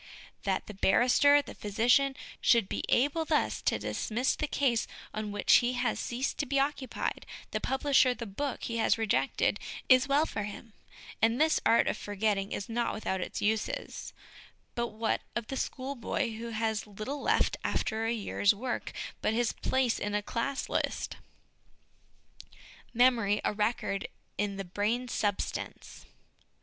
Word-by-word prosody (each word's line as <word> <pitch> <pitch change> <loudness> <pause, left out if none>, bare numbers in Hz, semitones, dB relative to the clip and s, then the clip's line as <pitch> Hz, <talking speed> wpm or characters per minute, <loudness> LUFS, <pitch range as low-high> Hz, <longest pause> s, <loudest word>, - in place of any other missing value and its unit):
That 190 -2 0
the 210 - -8
barrister, 255 +9 +5
the - - -9
physician, 245 +6 +2 0.3
should 230 -5 +4
be - - -3
able 290 +6 +3
thus 310 -1 0
to - - +1
dismiss 245 +5 -1
the 305 - -2
case 255 -6 +1 0.3
on 215 -1 -3
which 205 0 +5
he 245 0 +1
has 245 0 0
ceased 250 +3 -2
to 285 - 0
be 275 +1 +1
occupied, 275 -1 -2 0.3
the - - -2
publisher 265 -1 +3
the 235 - -6
book 250 +7 -4
he 230 - -2
has 225 - +3
rejected, 220 -2 +1 0.3
is 255 +1 +6
well 285 +3 +3
for 220 - -4
him, 210 +2 -7 0.5
and 225 +2 +3
this 315 +1 +4
art 230 - +5
of - - 0
for 205 - -6
getting 200 -1 0
is 195 - -3
not 235 +1 -1
without 190 -3 -2
its - - -4
uses: 215 +1 -2 0.6
but 235 0 -1
what 220 0 -1
of 235 - -2
the 270 - -3
schoolboy 260 -2 -2
who 230 +1 -6
has 220 -1 -1
little 215 +8 -5
left - - +2
after 225 0 -1
a - - +1
year's 205 -2 +2
work 245 +4 -4 0.3
but 220 - +1
his 240 -1 +1
place 260 -3 +1
in 205 0 -2
a 210 - 0
class 265 +6 -2
list? - - -2 1.7
Memory 230 -4 +3
a - - +1
Record 210 -2 -1 0.3
in 205 -1 0
the 195 - -4
Brain 210 +7 -1
Substance. 205 -4 -3
230 Hz, 160 wpm, -30 LUFS, 210-260 Hz, 1.7 s, is